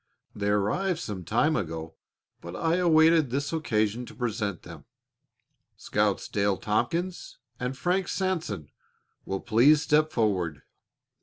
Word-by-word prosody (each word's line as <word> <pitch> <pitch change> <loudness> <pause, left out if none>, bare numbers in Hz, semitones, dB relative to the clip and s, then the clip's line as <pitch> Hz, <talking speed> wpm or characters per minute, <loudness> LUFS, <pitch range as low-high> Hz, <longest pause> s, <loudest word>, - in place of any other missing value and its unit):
They 100 0 -1
arrived 105 - +1
some 105 - -5
time - - +2
ago, 80 0 -4 0.5
but 85 +1 -8
I 165 - +1
awaited 160 -4 +4
this 140 +5 -2
occasion 110 -7 0
to - - -12
present 110 -7 -3
them. - - -11 0.9
Scouts 105 -1 0
Dale 100 -1 0
Tompkins 175 - -2 0.2
and 125 +1 -3
Frank 180 +5 0
Sanson 165 - -2 0.5
will 95 0 -3
please 135 +7 +4
step 155 +1 +3
forward." 90 - 0
120 Hz, 125 wpm, -27 LUFS, 100-160 Hz, 0.9 s, awaited